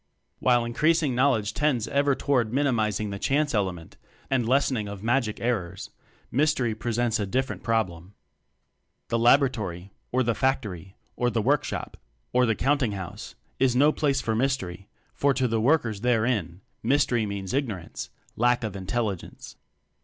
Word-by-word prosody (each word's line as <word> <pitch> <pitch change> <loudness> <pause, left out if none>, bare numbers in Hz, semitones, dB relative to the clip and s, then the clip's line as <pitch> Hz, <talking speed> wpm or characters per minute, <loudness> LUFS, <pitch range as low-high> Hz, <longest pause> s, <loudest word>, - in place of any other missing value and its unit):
While 120 -2 +3
increasing 155 +4 +2
knowledge 120 -5 +2
tends 140 -7 +1
ever 140 0 +2
toward 125 -7 +1
minimizing 110 -7 0
the 100 - -5
"chance" 145 +4 +1
element 95 -6 -2 0.3
and 125 -4 +1
lessening 130 -5 +2
of 100 0 -8
"magic" 120 -2 0
errors, 95 -7 -2 0.4
mystery 135 -4 +1
presents 115 +1 -1
a 105 - -1
different 130 +6 -2
problem. 100 -5 -2 0.9
The 115 - +1
laboratory, 110 -8 +2 0.2
or 130 +1 +2
the 120 -1 +1
factory, 105 - -2 0.2
or 125 - +1
the 115 - -1
workshop, 140 +5 -1 0.4
or 125 0 +4
the 110 - +2
countinghouse, 115 -9 -2 0.2
is 130 -1 +3
no 145 +4 +5
place 140 -3 0
for 110 - -1
"mystery," 105 -7 -2 0.2
for 140 -1 +2
to 130 -2 +1
the 115 -1 0
workers 120 -6 +2
therein 110 -7 0 0.2
mystery 120 -3 +2
means 100 -2 -4
ignorance 110 -11 -3 0.3
lack 120 +1 +2
of 105 -3 -4
intelligence. 100 0 -4
120 Hz, 140 wpm, -26 LUFS, 105-135 Hz, 0.9 s, no